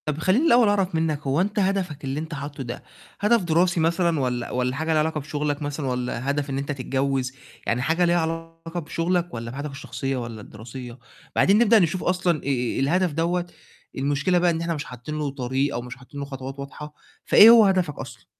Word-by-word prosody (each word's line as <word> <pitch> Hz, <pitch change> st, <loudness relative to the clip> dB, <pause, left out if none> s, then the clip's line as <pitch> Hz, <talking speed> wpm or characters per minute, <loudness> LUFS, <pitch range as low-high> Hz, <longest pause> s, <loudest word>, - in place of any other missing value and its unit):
طَب 150 Hz, -1 st, -2 dB
خلّيني 190 Hz, -, +2 dB
الأول 240 Hz, -6 st, +6 dB
أعرف 195 Hz, -4 st, +1 dB
منّك 160 Hz, -2 st, 0 dB
هو 140 Hz, +5 st, +2 dB
أنت 205 Hz, +2 st, -1 dB
هدفك 185 Hz, -6 st, -1 dB
اللي 135 Hz, +2 st, -2 dB
أنت 160 Hz, +1 st, -6 dB
حاطّه 140 Hz, -1 st, -6 dB
ده 120 Hz, -1 st, -7 dB, 0.4 s
هدف 220 Hz, +2 st, +3 dB
دراسي 175 Hz, +1 st, +2 dB
مثلًا 170 Hz, 0 st, +2 dB
والّا 125 Hz, -2 st, -2 dB
والّا 125 Hz, 0 st, -1 dB
حاجة 160 Hz, +3 st, -3 dB
ليها 155 Hz, -, +3 dB
علاقة 155 Hz, 0 st, 0 dB
بشُغلك 145 Hz, 0 st, -3 dB
مثلًا 145 Hz, 0 st, -3 dB
والّا 125 Hz, 0 st, -2 dB
هدف 145 Hz, 0 st, -2 dB
إن 135 Hz, -, -2 dB
أنت 140 Hz, +2 st, -3 dB
تتجوِّز؟ 135 Hz, -1 st, -1 dB, 0.3 s
يعني 120 Hz, +2 st, +1 dB
حاجة 165 Hz, +6 st, +2 dB
ليها 175 Hz, 0 st, +3 dB
علاقة 165 Hz, +1 st, -5 dB
بشُغلك 175 Hz, +2 st, -1 dB
والّا 115 Hz, 0 st, -5 dB
بحياتك 140 Hz, +3 st, -5 dB
الشخصية 135 Hz, -1 st, -4 dB
والّا 115 Hz, -3 st, -6 dB
الدراسية؟ 120 Hz, +4 st, -10 dB, 0.4 s
بعدين 200 Hz, +2 st, +5 dB
نبدأ 230 Hz, -1 st, +6 dB
نشوف 175 Hz, 0 st, 0 dB
أصلًا 180 Hz, -2 st, +1 dB
آآ 140 Hz, -, -9 dB, 0.3 s
الهدف 175 Hz, +6 st, +2 dB
دوّة، 170 Hz, +3 st, 0 dB, 0.5 s
المشكلة 145 Hz, +6 st, +1 dB
بقى 175 Hz, 0 st, +3 dB
إن 165 Hz, 0 st, -2 dB
إحنا 170 Hz, 0 st, -1 dB
مش 145 Hz, -, -5 dB
حاطّين 125 Hz, +5 st, -7 dB
له 150 Hz, -2 st, -1 dB
طريق 135 Hz, +1 st, -1 dB
أو 120 Hz, -, -2 dB
مش 125 Hz, +1 st, -8 dB
حاطّين 135 Hz, +2 st, -11 dB
له 140 Hz, -, -3 dB
خطوات 135 Hz, 0 st, -7 dB
واضحة، 150 Hz, +2 st, -8 dB, 0.3 s
فإيه 220 Hz, -, +9 dB
هو 230 Hz, -2 st, +8 dB
هدفك 185 Hz, -7 st, +1 dB
أصلًا؟ -, -, -9 dB
150 Hz, 200 wpm, -24 LUFS, 135-175 Hz, 0.5 s, فإيه